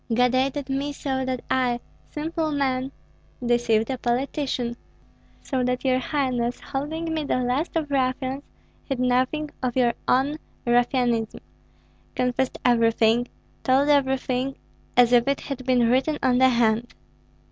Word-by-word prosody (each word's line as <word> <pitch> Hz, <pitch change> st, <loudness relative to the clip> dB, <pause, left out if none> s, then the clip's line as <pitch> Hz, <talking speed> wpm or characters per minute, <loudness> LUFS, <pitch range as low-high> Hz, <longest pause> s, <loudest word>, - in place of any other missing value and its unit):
God 250 Hz, +2 st, +3 dB
aided 270 Hz, +2 st, 0 dB
me, 275 Hz, +1 st, -2 dB
so 265 Hz, -2 st, -2 dB
that 255 Hz, -1 st, -3 dB
I, 250 Hz, -2 st, +1 dB, 0.3 s
simple 315 Hz, +1 st, -2 dB
man, 265 Hz, -2 st, -1 dB, 0.5 s
deceived 235 Hz, -1 st, +2 dB
a 260 Hz, -, -3 dB
politician, 250 Hz, 0 st, -1 dB, 0.7 s
so 260 Hz, -2 st, -1 dB
that 250 Hz, +1 st, -1 dB
your 255 Hz, -1 st, +3 dB
highness, 250 Hz, -3 st, -1 dB
holding 320 Hz, +4 st, -4 dB
me 315 Hz, -1 st, -1 dB
the 280 Hz, -, 0 dB
last 255 Hz, +7 st, -1 dB
of 305 Hz, -3 st, -1 dB
ruffians, 260 Hz, 0 st, 0 dB, 0.4 s
hid 270 Hz, -3 st, -3 dB
nothing 255 Hz, +4 st, +1 dB
of 250 Hz, -2 st, -2 dB
your 240 Hz, -2 st, +3 dB
own 280 Hz, +4 st, +2 dB, 0.3 s
ruffianism, 240 Hz, -2 st, +1 dB, 0.7 s
confessed 250 Hz, +1 st, 0 dB
everything, 230 Hz, 0 st, +3 dB, 0.4 s
told 270 Hz, +2 st, +3 dB
everything, 265 Hz, -2 st, +1 dB, 0.4 s
as 245 Hz, 0 st, +6 dB
if 240 Hz, 0 st, +5 dB
it 275 Hz, 0 st, 0 dB
had 270 Hz, -2 st, -6 dB
been 245 Hz, -2 st, +4 dB
written 265 Hz, +5 st, +2 dB
on 250 Hz, -1 st, +3 dB
the 260 Hz, 0 st, +6 dB
hand. 235 Hz, -1 st, +1 dB
255 Hz, 135 wpm, -24 LUFS, 245-275 Hz, 0.7 s, as